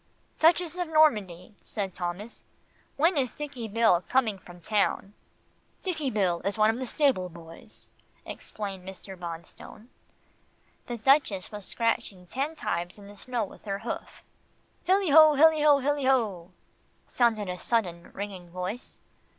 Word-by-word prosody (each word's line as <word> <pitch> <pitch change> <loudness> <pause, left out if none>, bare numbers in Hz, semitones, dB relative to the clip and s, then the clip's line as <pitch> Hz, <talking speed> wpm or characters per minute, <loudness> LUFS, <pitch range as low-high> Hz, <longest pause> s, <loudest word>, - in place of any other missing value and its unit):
"Duchess 340 +1 +3
of 355 - -1
Normandy," 215 - +2
said 195 -4 -4
Thomas, 180 +6 -5 0.5
"when 330 +5 +3
is 260 -3 +1
Dicky 275 -4 -6
Bill 220 -5 +3
coming 225 -6 +2
from 175 -1 -14
town?" 200 +1 0 0.7
"Dicky 315 -7 -2
Bill 185 -6 0
is 200 +3 -1
one 215 +1 +5
of 225 - -5
the 260 - -4
stable 255 -11 +1
boys," 165 -1 -13 0.4
explained 195 -3 -7
Mr. 190 +1 -9
Bonstone. 175 +6 -9 1.0
The 240 - -4
Duchess 230 -6 +2
was 205 -2 -7
scratching 220 -5 -1
ten 275 - -3
times 175 - -3
in 205 - -13
the 205 - -12
snow 245 +2 -3
with - - -15
her 195 -1 -2
hoof. - - -6 0.6
"Hille 380 -3 +3
ho, 310 0 +8
hille 315 +1 +5
ho, 295 -1 +6
hille 280 0 0
ho," 200 -9 0 0.5
sounded 225 -4 +1
a 180 0 -4
sudden 180 -8 -1
ringing 190 -3 -7
voice. 185 +7 -6
215 Hz, 140 wpm, -27 LUFS, 185-275 Hz, 1.0 s, ho